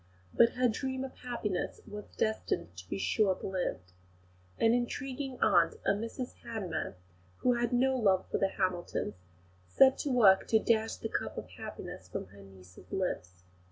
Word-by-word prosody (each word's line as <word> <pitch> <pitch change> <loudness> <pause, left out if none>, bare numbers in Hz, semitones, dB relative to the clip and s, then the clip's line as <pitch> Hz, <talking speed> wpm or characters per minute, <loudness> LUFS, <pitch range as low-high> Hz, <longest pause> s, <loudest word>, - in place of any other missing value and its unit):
But 235 - +5
her 250 0 +3
dream 260 +3 -2
of 265 - -6
happiness 230 -6 -3
was 210 -1 -9
destined 215 - -1
to 90 +1 -11
be 100 - -2
short 190 - +1
lived. 175 - -3 0.7
An 225 0 +4
intriguing 260 +2 -2
aunt, 175 -6 +4
Mrs 230 +4 -1
Hanmer, 185 - -3 0.5
who 250 - +4
had 240 0 0
no 260 +2 +3
love 195 -6 +3
for - - +1
the 195 - +3
Hamiltons, 185 -3 -1 0.5
set 265 - +5
to 290 - -1
work 215 -7 +6
to 220 - +5
dash 220 0 +2
the - - -4
cup - - -3
of - - -6
happiness - - -8
from - - -4
her 100 +1 -14
niece's 90 -2 -15
lips. 90 - -3
215 Hz, 155 wpm, -31 LUFS, 175-245 Hz, 0.7 s, work